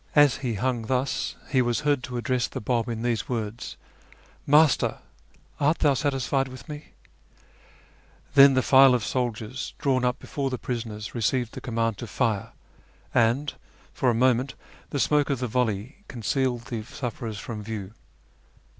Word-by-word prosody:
As 145 Hz, -3 st, +6 dB
he 120 Hz, -4 st, -2 dB
hung 120 Hz, +1 st, -1 dB
thus 130 Hz, +2 st, -1 dB, 0.2 s
he 130 Hz, -, +4 dB
was 120 Hz, +2 st, 0 dB
heard 145 Hz, -3 st, +2 dB
to 125 Hz, -1 st, -5 dB
address 125 Hz, 0 st, 0 dB
the -, -, -6 dB
Bab 120 Hz, +1 st, 0 dB
in 115 Hz, -1 st, -3 dB
these 120 Hz, -2 st, -1 dB
words: 115 Hz, -2 st, -4 dB, 0.3 s
" -, -, -27 dB
Master! 155 Hz, -4 st, +3 dB, 0.6 s
art 150 Hz, +3 st, +3 dB
thou 145 Hz, -2 st, +3 dB
satisfied 135 Hz, -1 st, 0 dB
with 130 Hz, -1 st, -11 dB
me? 150 Hz, 0 st, -9 dB, 0.7 s
" -, -, -30 dB
Then 140 Hz, -1 st, +8 dB
the 130 Hz, -, +3 dB
file 135 Hz, -1 st, +7 dB
of 115 Hz, -5 st, -1 dB
soldiers 125 Hz, 0 st, -3 dB
drawn 130 Hz, -2 st, +1 dB
up 125 Hz, 0 st, +1 dB
before 140 Hz, -2 st, -3 dB
the 130 Hz, -, -3 dB
prisoners 110 Hz, -4 st, -5 dB
received 120 Hz, 0 st, 0 dB
the -, -, -7 dB
command 115 Hz, -3 st, -1 dB
to 120 Hz, -, -5 dB
fire, 110 Hz, 0 st, -1 dB, 0.6 s
and 120 Hz, +6 st, +2 dB, 0.4 s
for 130 Hz, -, +1 dB
a 120 Hz, -, +2 dB
moment 130 Hz, +2 st, +2 dB, 0.3 s
the 140 Hz, -, -2 dB
smoke 150 Hz, +1 st, +2 dB
of 140 Hz, -, +1 dB
the 125 Hz, -, -2 dB
volley 120 Hz, 0 st, -1 dB
concealed 125 Hz, +1 st, -1 dB
the 120 Hz, -1 st, -5 dB
sufferers 115 Hz, -1 st, -5 dB
from 115 Hz, -5 st, -6 dB
view. 105 Hz, -2 st, -6 dB
125 Hz, 165 wpm, -26 LUFS, 115-135 Hz, 0.7 s, Then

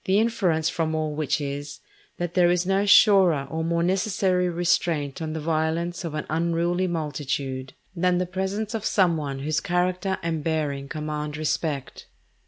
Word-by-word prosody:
The 190 Hz, +1 st, +3 dB
inference 185 Hz, -8 st, +1 dB
from 160 Hz, -2 st, -1 dB
all 155 Hz, -1 st, -1 dB
which 150 Hz, 0 st, 0 dB
is, 145 Hz, 0 st, -5 dB, 0.4 s
that 175 Hz, -1 st, -3 dB
there 175 Hz, -1 st, +4 dB
is 175 Hz, 0 st, +1 dB
no 195 Hz, +2 st, +1 dB
surer 190 Hz, -9 st, +6 dB
or 160 Hz, 0 st, -2 dB
more 170 Hz, +1 st, 0 dB
necessary 185 Hz, -1 st, +1 dB
restraint 165 Hz, -4 st, 0 dB
on 155 Hz, -1 st, -3 dB
the 160 Hz, -, -3 dB
violence 165 Hz, +3 st, -1 dB
of 165 Hz, -3 st, -4 dB
an 150 Hz, -, -3 dB
unruly 170 Hz, +3 st, 0 dB
multitude, 140 Hz, -5 st, -3 dB, 0.2 s
than 180 Hz, +1 st, +2 dB
the 180 Hz, -, 0 dB
presence 190 Hz, +4 st, -3 dB
of 220 Hz, -2 st, -3 dB
some 185 Hz, -6 st, +3 dB
one 140 Hz, -3 st, -3 dB
whose 155 Hz, +2 st, 0 dB
character 180 Hz, +2 st, 0 dB
and 165 Hz, -2 st, -2 dB
bearing 145 Hz, -4 st, -2 dB
command 150 Hz, -1 st, -4 dB
respect. 150 Hz, -2 st, -3 dB
165 Hz, 165 wpm, -25 LUFS, 150-180 Hz, 0.4 s, surer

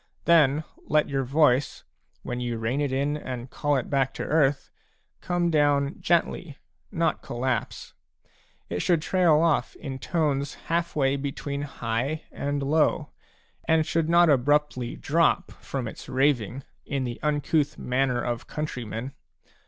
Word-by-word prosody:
Then 155 Hz, -3 st, +4 dB, 0.2 s
let 150 Hz, 0 st, +2 dB
your 135 Hz, -1 st, 0 dB
voice, 140 Hz, 0 st, +2 dB, 0.4 s
when 125 Hz, 0 st, -4 dB
you 120 Hz, -1 st, -2 dB
rein 115 Hz, +6 st, -1 dB
it 145 Hz, -2 st, 0 dB
in 140 Hz, +3 st, 0 dB
and 125 Hz, -4 st, -6 dB
call 145 Hz, -1 st, 0 dB
it 130 Hz, -, -1 dB
back 135 Hz, -2 st, 0 dB
to -, -, -3 dB
earthj 145 Hz, -3 st, +1 dB, 0.5 s
come 175 Hz, -1 st, 0 dB
down 145 Hz, -1 st, +2 dB
gently, 170 Hz, -3 st, 0 dB, 0.3 s
not 170 Hz, -4 st, 0 dB
collapse; 120 Hz, 0 st, -3 dB, 0.7 s
it 90 Hz, -, -3 dB
should 175 Hz, -3 st, +3 dB
trail 175 Hz, -3 st, +3 dB
off 165 Hz, -2 st, +1 dB
in 135 Hz, -2 st, -6 dB
tones 145 Hz, -3 st, -1 dB
half 170 Hz, +1 st, -2 dB
way 135 Hz, -2 st, +2 dB
between 140 Hz, 0 st, -4 dB
high 135 Hz, +1 st, -3 dB
and 145 Hz, 0 st, -2 dB
low, 150 Hz, +3 st, +1 dB, 0.6 s
and 160 Hz, -1 st, +3 dB
should 165 Hz, 0 st, 0 dB
not 170 Hz, 0 st, +6 dB
abruptly 145 Hz, -3 st, +2 dB
drop 165 Hz, +3 st, +1 dB
from 130 Hz, -3 st, -4 dB
its -, -, -9 dB
raving 130 Hz, -2 st, +1 dB, 0.2 s
in 140 Hz, -2 st, -2 dB
the 120 Hz, -2 st, -4 dB
uncouth 150 Hz, 0 st, 0 dB
manner 125 Hz, -1 st, 0 dB
of 120 Hz, -1 st, -3 dB
countrymen. 125 Hz, -4 st, -5 dB
140 Hz, 140 wpm, -26 LUFS, 130-155 Hz, 0.7 s, not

